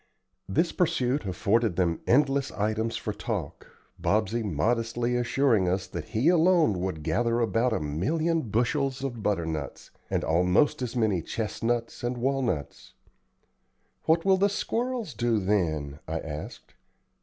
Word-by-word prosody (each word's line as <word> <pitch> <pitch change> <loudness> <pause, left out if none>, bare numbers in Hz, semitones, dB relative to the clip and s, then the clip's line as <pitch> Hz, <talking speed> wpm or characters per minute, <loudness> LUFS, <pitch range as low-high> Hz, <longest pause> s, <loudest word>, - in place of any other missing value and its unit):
This 165 - +1
pursuit 140 - 0
afforded 100 +2 +1
them 85 -2 +1
endless 140 +1 +3
items 110 +2 -1
for - - -4
talk, - - -5 0.3
Bobsey 110 +2 +1
modestly 115 +6 0
assuring 120 -4 +2
us 95 +1 -1
that 85 -3 -6
he 115 - 0
alone 170 - +4
would 90 -5 -3
gather 115 +9 +1
about 115 +1 +1
a 110 - 0
million 155 - 0
bushels 135 +4 0
of 120 -5 -4
butternuts, 80 -8 -3 0.2
and - - 0
almost 90 - +2
as 125 -1 -3
many 110 -7 +1
chestnuts 115 +5 -2
and 120 +1 -1
walnuts. 120 - -2 1.1
"What 165 +2 +3
will 190 -1 +5
the 200 +2 +3
squirrels 235 - -2
do 115 0 +1
then?" 80 -8 0
I 80 +1 -2
asked. 75 -1 -8
115 Hz, 130 wpm, -27 LUFS, 95-135 Hz, 1.1 s, will